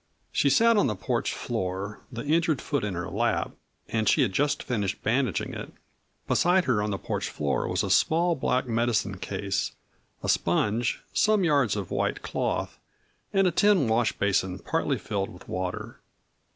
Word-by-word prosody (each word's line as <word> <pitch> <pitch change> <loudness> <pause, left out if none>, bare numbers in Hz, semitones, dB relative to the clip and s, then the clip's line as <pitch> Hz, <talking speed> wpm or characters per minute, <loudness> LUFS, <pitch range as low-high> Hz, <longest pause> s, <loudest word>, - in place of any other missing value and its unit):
She 140 - +2
sat 230 - +5
on 205 - +4
the 105 - -1
porch 95 - -1
floor, 95 +3 -3
the 115 +2 -6
injured 155 -1 +2
foot 145 -6 -2
in 100 -3 -2
her 90 0 -3
lap, - - 0 0.4
and 110 -2 +1
she - - +4
had 95 - -1
just 145 +5 +1
finished 105 -5 -2
bandaging 120 -1 0
it. - - -7 0.6
Beside 180 +1 +3
her 115 -5 +2
on 105 - -1
the 100 - -1
porch - - -3
floor - - -1
was - - 0
a - - -1
small 170 +2 +3
black 130 -4 0
medicine 115 -5 0
case, 95 0 -2 0.5
a - - -2
sponge, 105 +7 +1
some 215 -2 +3
yards 140 - +3
of 100 -4 -4
white - - -1
cloth, - - -2 0.5
and 195 -1 +3
a 180 - +3
tin 195 - +4
wash 110 -1 +2
basin 95 -2 0
partly 145 +4 -1
filled 100 0 -3
with 90 - -14
water. 90 0 -4
115 Hz, 170 wpm, -27 LUFS, 100-150 Hz, 0.6 s, sat